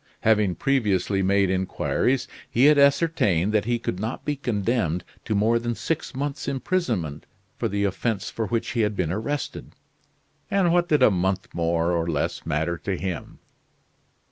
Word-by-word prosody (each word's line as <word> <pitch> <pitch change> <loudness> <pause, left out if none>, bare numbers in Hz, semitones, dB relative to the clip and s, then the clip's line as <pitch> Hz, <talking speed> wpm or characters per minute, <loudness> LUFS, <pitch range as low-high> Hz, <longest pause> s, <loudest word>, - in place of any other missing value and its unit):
Having 105 -4 +3
previously 105 -7 +1
made 100 0 +2
inquiries 95 +7 0 0.2
he 125 +4 +3
had 150 0 +6
ascertained 140 - +3
that 105 -2 +2
he 120 0 +1
could 90 -5 -4
not 110 +5 -4
be 150 - 0
condemned 105 - -1 0.2
to 110 - -1
more 110 +3 +3
than 120 0 -2
six 160 0 -3
months' 140 +1 -3
imprisonment 125 - -2 0.3
for 115 - +1
the 100 -1 -1
offense 100 +1 -1
for 110 -2 -3
which 115 +3 -1
he 120 - 0
had 105 -1 0
been 90 -4 -1
arrested; 120 +8 -4 0.8
and 190 -4 +2
what 175 -1 +2
did 150 -4 +4
a 110 - +7
month 95 0 -1
more 85 0 +1
or 85 -1 0
less 75 0 -2
matter 80 +2 -1
to 95 -2 -3
him? 95 -3 -5
105 Hz, 165 wpm, -24 LUFS, 95-130 Hz, 0.8 s, a